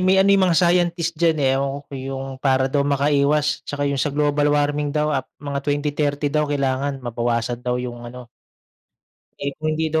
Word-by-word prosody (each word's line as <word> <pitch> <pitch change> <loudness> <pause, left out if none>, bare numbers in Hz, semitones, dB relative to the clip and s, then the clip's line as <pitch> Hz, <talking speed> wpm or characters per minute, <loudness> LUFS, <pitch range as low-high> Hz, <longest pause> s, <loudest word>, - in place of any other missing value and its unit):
may 185 +1 +4
ano 195 +1 +5
yang 195 -1 +4
mga 165 - +2
scientist 175 -2 +2
diyan, 165 -2 +3
eh, 130 - +4
ewan 140 +1 -3
ko 140 - -21
yung 135 0 -5
para 130 -1 +2
daw 145 - +2
makaiwas, 145 +1 +2
'tsaka 145 0 -2
yung 140 - -1
sa 145 - +1
global 145 0 +2
warming 145 0 +1
daw 150 0 +1
ap 130 -1 -2
mga 140 -1 -4
2030 145 0 -1
daw 150 -1 +1
kailangan 135 -1 -1
mabawasan 120 0 -1
daw 125 0 -1
yung 120 -1 -6
ano. 125 0 -11 1.1
Eh, 140 0 -2
kung 155 0 -1
hindi 160 -1 -1
daw 160 - +2
145 Hz, 190 wpm, -22 LUFS, 135-150 Hz, 1.1 s, ano